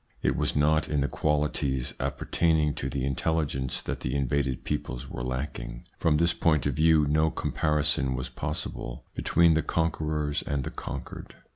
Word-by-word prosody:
It - - +2
was - - 0
not 75 +2 +3
in 75 -2 +1
the 70 - +2
qualities 75 -4 0
appertaining 80 -3 +1
to 65 - -3
the 65 0 -2
intelligence 70 -2 -1
that - - -3
the 60 - -3
invaded 70 -1 0
peoples 70 -3 -3
were - - -6
lacking. 65 -2 -4 0.2
From 75 -2 +3
this 85 +2 +3
point 80 -4 +2
of 70 - +1
view 80 -1 +4
no 80 +2 +3
comparison 75 -4 0
was 65 0 -3
possible - - -5
between 85 -1 +4
the 80 - +3
con 80 0 +1
querors 75 -1 -1
and 70 -1 0
the - - -4
conquered. - - -7
75 Hz, 165 wpm, -28 LUFS, 65-80 Hz, 0.2 s, view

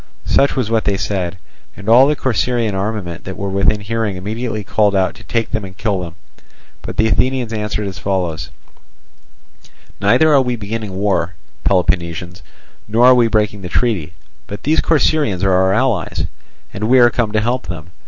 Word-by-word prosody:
Such 140 - +2
was 125 -5 -1
what 110 -2 +1
they 100 -1 +1
said, 95 -3 -2 0.4
and 100 - -10
all 125 +4 +7
the 150 - +2
Corcyraean 120 -4 0
armament 95 -3 -3
that 95 - -6
were 100 0 -3
within 100 +2 +1
hearing 110 -1 -2
immediately 110 +3 -4
called 100 +1 +1
out 95 -1 +1
to - - -15
take 115 -2 -2
them 110 -3 -2
and 95 -1 -10
kill 105 -3 -1
them. 85 -2 -7 0.7
But - - -7
the 110 - +3
Athenians 125 0 0
answered 105 -1 -2
as 95 -1 -6
follows: 90 -6 -2 1.5
"Neither 155 +10 +4
are 140 - +6
we 125 -1 -1
beginning 110 -2 -5
war, 95 -3 0 0.3
Peloponnesians, 85 -2 0 0.5
nor 115 +4 +3
are 130 - +8
we 120 -2 +4
breaking 105 -2 0
the 90 - -6
treaty; 90 -10 -1 0.3
but 100 - -8
these 155 +2 +2
Corcyraeans 150 - +1
are 95 - +3
our 95 +1 +3
allies, 110 -5 0 0.5
and 105 - -3
we 130 - +6
are 120 -1 +6
come 115 -3 -1
to 105 - +3
help 120 +4 -1
them. 85 0 -7
105 Hz, 180 wpm, -17 LUFS, 95-115 Hz, 1.5 s, are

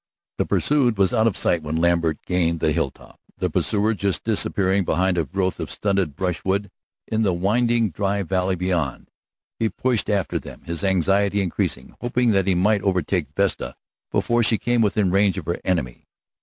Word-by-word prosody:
The - - +1
pursued 130 -7 +2
was 95 -2 +2
out 110 +1 +3
of 110 - 0
sight 85 - +1
when 75 +1 -4
Lambert 85 -1 +1
gained 85 -2 0
the 80 - +1
hilltop, - - -4 0.2
the - - -1
pursuer 105 +2 +1
just 100 -2 -2
disappearing 100 -3 +1
behind 90 +2 +1
a 85 -3 0
growth 95 +6 -2
of 80 - -4
stunted 95 -3 0
brushwood 95 +3 -1 0.4
in 110 0 0
the 100 -4 +2
winding 115 +4 +1
dry 100 +3 -1
valley 95 +1 0
beyond. 85 -6 -2 0.5
He 115 - +1
pushed 120 -4 0
after 100 -4 0
them, - - -11
his 85 +2 -4
anxiety 100 +2 +2
increasing, 85 -8 -2
hoping 120 -1 +1
that 95 -2 +1
he 95 - +3
might 100 +3 +2
overtake 90 -4 0
Vesta - - 0 0.4
before 120 0 +1
she 110 0 +3
came 120 +1 +1
within 105 -3 +2
range 100 0 +3
of 90 - -5
her 85 +1 -2
enemy. 75 -10 -2
95 Hz, 175 wpm, -22 LUFS, 85-105 Hz, 0.5 s, out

